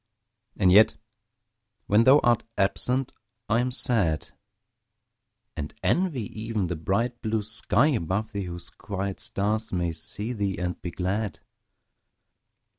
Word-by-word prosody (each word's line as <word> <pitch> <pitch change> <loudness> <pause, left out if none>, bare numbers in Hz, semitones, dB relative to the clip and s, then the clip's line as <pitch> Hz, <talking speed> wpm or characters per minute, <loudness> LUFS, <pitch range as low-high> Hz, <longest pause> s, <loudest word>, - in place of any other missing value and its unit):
And 90 - +4
yet 105 +4 +6 0.9
when 105 +3 +4
thou 135 +2 +8
art 120 -2 +3
absent 115 +7 0 0.3
I 115 +1 +3
am 125 +1 +1
sad; 110 - 0 1.3
And 75 0 -5
envy 170 -10 +1 0.2
even 110 -3 -1
the 90 0 -2
bright 115 +9 -1
blue 110 -1 0
sky 110 +5 +2
above 105 - -1
thee, 100 -2 -3
Whose 85 -1 -5
quiet 100 -1 -4
stars 110 +2 -2
may 85 -2 0
see 105 +8 -5
thee 100 -4 -1
and 90 -1 -3
be 90 - -4
glad. 95 +4 -2
105 Hz, 125 wpm, -26 LUFS, 95-115 Hz, 1.3 s, thou